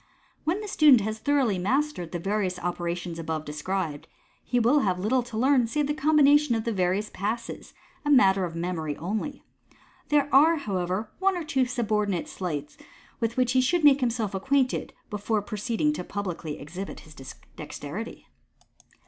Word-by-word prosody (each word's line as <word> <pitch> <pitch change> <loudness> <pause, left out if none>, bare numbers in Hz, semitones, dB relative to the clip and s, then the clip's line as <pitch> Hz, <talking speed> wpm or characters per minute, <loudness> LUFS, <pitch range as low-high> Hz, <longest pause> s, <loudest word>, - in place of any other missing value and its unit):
When 355 +7 0
the 420 - -6
student 295 - +6
has 220 +2 -3
thoroughly 265 -8 +1
mastered 250 - -1
the 175 - -2
various 195 0 -1
operations 175 -1 -3
above 160 -1 -3
described, 150 0 -3 0.4
he 245 - 0
will 245 +6 +4
have 190 -9 +1
little 220 +8 +1
to 235 -2 -7
learn 255 0 +3
save 295 +5 0
the 295 - -1
combination 295 -2 +4
of 225 - -1
the 230 - -1
various 190 +2 0
Passes, 220 +4 -4 0.3
a 295 - -2
matter 195 -9 +5
of 170 -2 -4
memory 165 -4 -3
only. 215 - -4 0.7
There 290 -2 +3
are, 310 +5 +7
however, 200 - -2
one 380 -1 +2
or 345 - -3
two 275 -4 +1
subordinate 210 -7 -1
sleights 150 -6 -5 0.4
with 230 +1 -2
which 250 -1 +2
he 260 0 +4
should 325 +6 +1
make 285 -2 +7
himself 230 -5 -1
acquainted 260 +6 0 0.2
before 210 0 -1
proceeding 230 +8 -1
publicly 180 - -4
to - - -13
exhibit 180 +7 -7
his 155 - -15 0.4
dexterity. 155 +8 -7
220 Hz, 160 wpm, -26 LUFS, 180-275 Hz, 0.7 s, are